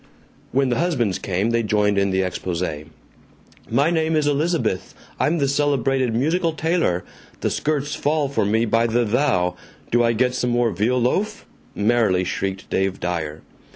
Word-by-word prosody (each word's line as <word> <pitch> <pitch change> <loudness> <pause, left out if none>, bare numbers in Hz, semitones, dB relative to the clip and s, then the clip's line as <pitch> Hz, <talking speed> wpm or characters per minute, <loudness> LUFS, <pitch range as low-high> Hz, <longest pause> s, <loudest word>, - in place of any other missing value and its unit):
When 135 0 +2
the 120 - 0
husbands 130 - 0
came 100 +4 -1
they 115 0 +2
joined 105 -2 +1
in 100 0 +2
the 95 0 +1
expose. 90 -1 -3 1.1
"My 145 +5 +2
name 160 -1 +1
is 155 -1 +2
Elizabeth. 145 - 0 0.2
I'm 165 +3 +2
the 140 -3 +1
celebrated 135 -3 +1
musical 165 +6 +1
tailor. 160 - 0 0.4
The - - 0
skirts 150 -1 -1
fall 150 -1 0
for 140 - 0
me 110 +3 +2
by 115 +1 +2
the 120 +1 +1
thou. 105 -7 +1 0.3
Do 120 0 +4
I 115 0 +3
get 125 +2 +1
some 125 -1 -1
more 120 -1 +2
veal 115 +7 +1
loaf?" 185 - -1 0.3
merrily 105 -4 +2
shrieked 95 +1 -3
Dave 95 0 0
Dyer. 80 -3 -3
120 Hz, 160 wpm, -22 LUFS, 100-145 Hz, 1.1 s, Do